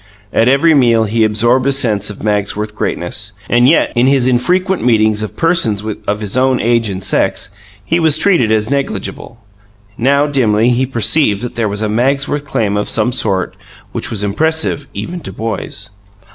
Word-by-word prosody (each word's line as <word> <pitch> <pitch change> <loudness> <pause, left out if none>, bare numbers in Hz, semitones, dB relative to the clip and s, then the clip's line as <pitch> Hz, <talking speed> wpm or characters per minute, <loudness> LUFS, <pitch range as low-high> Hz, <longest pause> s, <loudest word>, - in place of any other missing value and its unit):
At 115 - +2
every 140 +5 +4
meal 120 -5 +3
he 110 +1 0
absorbed 120 +5 +2
a - - +3
sense 110 -7 +2
of 105 - -9
Magsworth 105 0 -2
greatness, 100 +1 -2
and 120 +2 +3
yet, 160 - +2
in 120 +1 +2
his 135 -2 +3
infrequent 180 +10 0
meetings 110 -3 +2
with 110 - -6
persons 165 - +1 0.2
of 105 +1 -2
his 105 0 -3
own 130 0 +2
age 115 -1 +1
and 95 -1 -5
sex, 95 +1 0 0.4
he 170 - 0
was 160 -3 +3
treated 150 - +2
as 110 -1 +1
negligible. 140 -4 -4 0.6
Now, 140 +4 +2
dimly, 120 -5 +1
he 125 +2 0
perceived 120 -3 +2
that 125 - -5
there 115 -3 -1
was 105 +2 -3
a - - 0
Magsworth 140 +6 -1
claim 105 -7 -1
of 105 - -2
some 115 +2 +2
sort 95 -7 -1 0.4
which - - -4
was 105 -2 -3
impressive, 150 +6 -1
even 175 +1 -5
to - - -8
boys. 110 -2 -5
120 Hz, 175 wpm, -14 LUFS, 105-140 Hz, 0.6 s, every